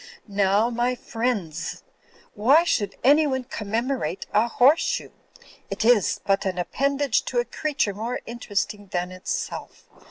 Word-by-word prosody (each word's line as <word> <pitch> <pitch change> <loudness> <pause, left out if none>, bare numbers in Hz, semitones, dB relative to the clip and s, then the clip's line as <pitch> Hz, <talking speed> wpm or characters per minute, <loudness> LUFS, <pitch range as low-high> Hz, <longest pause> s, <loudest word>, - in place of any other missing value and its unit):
Now, 200 +3 +2
my 240 +2 0
friendss, 225 -10 -3 0.5
why 270 +11 +5
should 205 - 0
anyone 280 -1 +4
commemorate 230 -1 -3
a 215 +3 +4
horse 260 +7 +4
shoe? - - -2 0.6
It - - -2
iss 235 -4 +4
but 195 0 +2
an 190 -2 -2
appendage 275 +8 +1
to - - -3
a 485 - +2
creature 285 -9 -1
more 225 +5 -3
interesting 210 -3 -3
than 180 0 -2
itself. 185 0 -5
230 Hz, 130 wpm, -24 LUFS, 200-260 Hz, 0.6 s, why